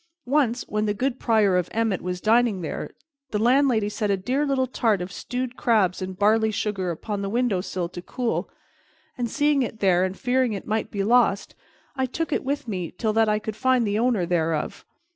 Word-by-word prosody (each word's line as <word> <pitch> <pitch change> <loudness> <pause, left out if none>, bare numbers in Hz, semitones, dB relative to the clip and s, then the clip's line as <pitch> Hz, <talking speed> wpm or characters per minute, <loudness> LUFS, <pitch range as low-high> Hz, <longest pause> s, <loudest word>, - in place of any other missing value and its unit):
Once, 250 -3 +1
when 210 0 -1
the 205 - 0
good 255 +3 -1
Prior 215 -5 +3
of 180 -1 -1
Emmet 225 -4 0
was 180 0 -3
dining 220 -2 +2
there, 160 - -4 0.4
the 210 - -1
landlady 240 -1 +3
set 210 0 -2
a 200 - +2
dear 260 +10 -1
little 265 -2 +1
tart 225 -5 +1
of 180 +1 -5
stewed 250 +3 -4
crabs 205 -8 +2
and 185 0 -5
barley 220 +2 +3
sugar 205 -3 -2
upon 200 +4 -4
the 195 - -2
window 230 -4 +1
sill 180 -2 -3
to 175 +1 -8
cool, 240 +5 -2 0.7
and, 240 -2 -2
seeing 295 0 +2
it 225 -3 -3
there, 185 -3 +3
and 190 0 -2
fearing 255 -2 +1
it 195 - -6
might 220 0 -1
be 200 -1 -2
lost, 225 -2 +2 0.4
I 260 -1 0
took 315 +5 -3
it - - 0
with 285 0 -2
me 185 -6 -3
till 220 -2 0
that 225 0 +3
I 210 - +2
could 215 0 -5
find 255 0 +2
the 205 +1 0
owner 230 -6 +2
thereof. 165 -3 -1
220 Hz, 205 wpm, -24 LUFS, 195-250 Hz, 0.7 s, Prior